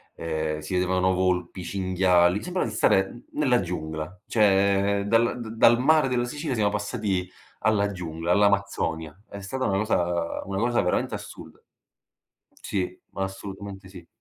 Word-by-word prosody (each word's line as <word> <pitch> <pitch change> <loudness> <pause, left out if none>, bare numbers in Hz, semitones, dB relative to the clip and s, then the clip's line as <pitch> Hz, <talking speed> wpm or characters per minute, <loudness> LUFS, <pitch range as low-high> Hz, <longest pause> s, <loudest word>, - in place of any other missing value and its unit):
ehm, 80 -1 -2
si 75 +4 -6
vedevano 90 0 +2
volpi, 90 -1 -1
cinghiali, 90 0 +2
sembrava 180 -3 -2
di 105 - -8
stare 95 -2 +3
n 120 - -13
nella 130 -5 +2
giungla, 85 +1 -5
cioè 100 -1 +3
dal 115 +3 +2
da 110 - -6 0.2
dal 120 +1 +5
mare 155 +1 +4
della 125 -1 0
Sicilia, 145 +2 -3
siamo 105 -2 +2
passati 100 -6 -2 0.3
alla 105 -1 +2
giungla, 85 -2 -4
all'Amazzonia. 100 -5 +1
È 100 - -9
stata 130 +7 -3
una 95 -1 +1
cosa 85 -5 0
una 95 0 -3
cosa 120 +1 +1
veramente 90 - 0
assurda. - - -9 1.0
Sì, 90 -2 -2
ma 95 - -3
assolutamente 95 0 -7
sì. 90 -3 -12
95 Hz, 150 wpm, -25 LUFS, 90-105 Hz, 1.0 s, dal